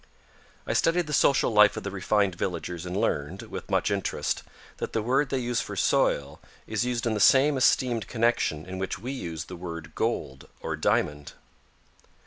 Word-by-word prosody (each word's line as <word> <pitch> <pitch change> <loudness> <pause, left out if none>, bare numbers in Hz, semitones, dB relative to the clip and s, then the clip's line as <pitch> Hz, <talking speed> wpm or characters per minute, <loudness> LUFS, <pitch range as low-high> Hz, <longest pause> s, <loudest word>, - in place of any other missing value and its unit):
I - - -1
studied 175 +1 +2
the 150 - -5
social 140 -3 +3
life 105 -1 +5
of - - -4
the 100 - -4
refined 100 0 +1
villagers 90 -1 -4
and 90 +2 -3
learned, 70 -6 -1
with - - -8
much - - +1
interest, 100 -1 -1 0.4
that - - -5
the 110 - +1
word 135 +4 +1
they 135 - 0
use 120 -1 -1
for - - -6
soil, 70 0 +1 0.3
is 110 +1 -1
used 125 -1 -2
in 115 - +1
the 105 - -1
same 140 +7 +5
esteemed 125 -2 +2
connection 115 -9 0
in 95 0 -6
which 95 -1 -3
we 120 +7 -5
use 85 - -5
the 90 - -8
word 85 -3 -7
gold 65 0 -3
or - - -3
diamond. 75 -1 0
105 Hz, 180 wpm, -27 LUFS, 85-125 Hz, 0.4 s, life